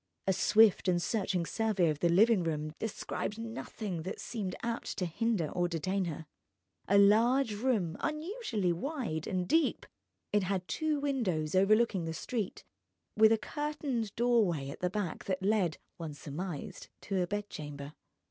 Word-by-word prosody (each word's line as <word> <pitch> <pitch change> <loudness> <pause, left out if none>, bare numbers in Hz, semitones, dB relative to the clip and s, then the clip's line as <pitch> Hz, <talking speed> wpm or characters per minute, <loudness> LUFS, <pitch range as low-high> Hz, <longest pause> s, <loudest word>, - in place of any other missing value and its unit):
A 190 - +3
swift 210 +1 +5
and 175 -1 +3
searching 185 -2 0
survey 210 -3 +1
of 150 -2 0
the 170 - +3
living 205 +2 +5
room 155 -2 -2
descried 215 -1 -3
nothing 225 -5 -5
that 185 - -5
seemed 200 -6 -4
apt 235 0 -3
to 180 - 0
hinder 175 -1 0
or 175 -1 0
detain 185 +3 -1
her. 160 -1 -5 0.6
A 200 - +4
large 225 +5 +5
room, 205 -7 0
unusually 305 - -1
wide 215 - -3
and 180 -1 -1
deep, 325 -1 +2 0.5
it 210 - +4
had 185 -1 -2
two 310 -2 0
windows 205 - -1
overlooking 195 -1 +3
the 165 0 -4
street, 215 +2 -3 0.5
with 220 0 +6
a 225 - +5
curtained 275 -4 -3
doorway 210 - +2
at - - -9
the 180 - 0
back 190 -4 -3
that 190 0 -2
led 195 -5 +2 0.2
(one 160 -3 -6
surmised) 155 +2 -6
to 195 -2 -1
a 175 - 0
bedchamber. 150 -8 -5
195 Hz, 155 wpm, -32 LUFS, 175-230 Hz, 0.6 s, with